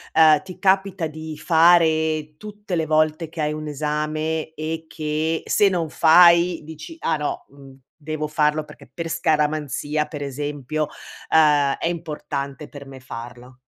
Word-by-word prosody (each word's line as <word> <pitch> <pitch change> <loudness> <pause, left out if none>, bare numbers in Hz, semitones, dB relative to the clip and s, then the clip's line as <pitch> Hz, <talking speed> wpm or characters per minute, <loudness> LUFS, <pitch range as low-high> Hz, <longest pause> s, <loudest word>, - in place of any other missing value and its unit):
uhm, 155 -2 +6
ti 185 +2 -11
capita 190 -2 +1
di 155 0 -7
fare 160 -2 +3
tutte 210 -1 -9
le 160 -2 -1
volte 155 +1 +1
che 165 0 -6
hai 150 0 0
un 155 0 -6
esame 155 +2 -3
e 160 +1 -4
che, 155 +1 -2
se 205 - +3
non 170 -4 -2
fai, 170 +1 +5
dici: 160 - -10
"Ah 160 - 0
no, 150 -1 -4
mhmm, 135 -1 -15 0.2
devo 155 -1 -4
farlo 150 0 +1
perché - - -15
per 165 -1 -5
scaramanzia 150 -1 0
per 150 -2 -6
esempio, 145 +1 -3 0.4
uhm, 145 -3 +4
è - - -4
importante 150 -4 -5
per 140 -1 -11
me 135 -1 -11
farlo"? 120 +1 -10
155 Hz, 150 wpm, -22 LUFS, 150-160 Hz, 0.4 s, uhm